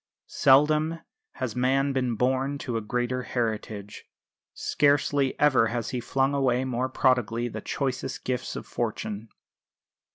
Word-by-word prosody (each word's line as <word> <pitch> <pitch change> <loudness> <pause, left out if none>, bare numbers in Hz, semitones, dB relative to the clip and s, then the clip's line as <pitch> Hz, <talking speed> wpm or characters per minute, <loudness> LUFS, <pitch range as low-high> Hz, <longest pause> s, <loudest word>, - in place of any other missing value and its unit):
Seldom 150 +4 +4 0.4
has 120 -5 -4
man 135 +2 +2
been 125 -3 0
born 130 +4 0
to 125 -4 -4
a 115 - 0
greater 125 +3 -1
heritage; 110 -4 -4 0.5
scarcely 145 -1 +1
ever 135 -6 +4
has 120 -1 -3
he 125 - -2
flung 135 +3 0
away 130 -2 +1
more 130 0 -1
prodigally 120 -3 +1
the 110 -2 -6
choicest 130 0 -3
gifts 125 -2 -3
of - - -6
fortune. 110 +1 -4
130 Hz, 130 wpm, -26 LUFS, 120-135 Hz, 0.5 s, Seldom